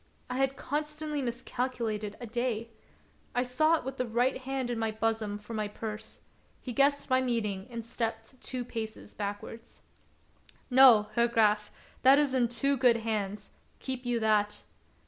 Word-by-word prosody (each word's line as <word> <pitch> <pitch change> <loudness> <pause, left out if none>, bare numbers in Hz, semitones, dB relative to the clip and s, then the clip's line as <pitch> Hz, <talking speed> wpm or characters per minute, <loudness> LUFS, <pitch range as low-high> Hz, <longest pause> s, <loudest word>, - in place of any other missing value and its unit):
I 250 - -2
had 270 0 +1
constantly 300 +1 -3
miscalculated 235 -4 -3
a 245 - -6
day. 230 -1 -2 0.6
I 245 - +2
sought 310 +5 +2
with 265 0 -5
the 250 - -1
right 245 +4 +1
hand 260 -1 -3
in 235 - -2
my 225 0 0
bosom 220 -1 -1
for 210 +2 -10
my 215 -1 -1
purse; 215 +1 -7 0.4
he 250 - -6
guessed 285 +2 +2
my 255 0 +5
meaning 215 -6 -1
and 230 -2 -6
stepped 230 +2 -4
two 250 -2 -4
paces 220 -2 -6
backwards. 205 +2 -6 0.9
"No, 245 -5 +8
Herr 235 +1 +3
Graf, 210 -2 +2 0.3
that 265 +2 +7
is 290 -3 +2
in 250 -2 +3
too 275 +4 +1
good 245 -2 +5
hands; 210 -3 -3 0.3
keep 260 -1 -4
you 245 -1 0
that." 210 -1 +1
235 Hz, 155 wpm, -30 LUFS, 220-260 Hz, 0.9 s, No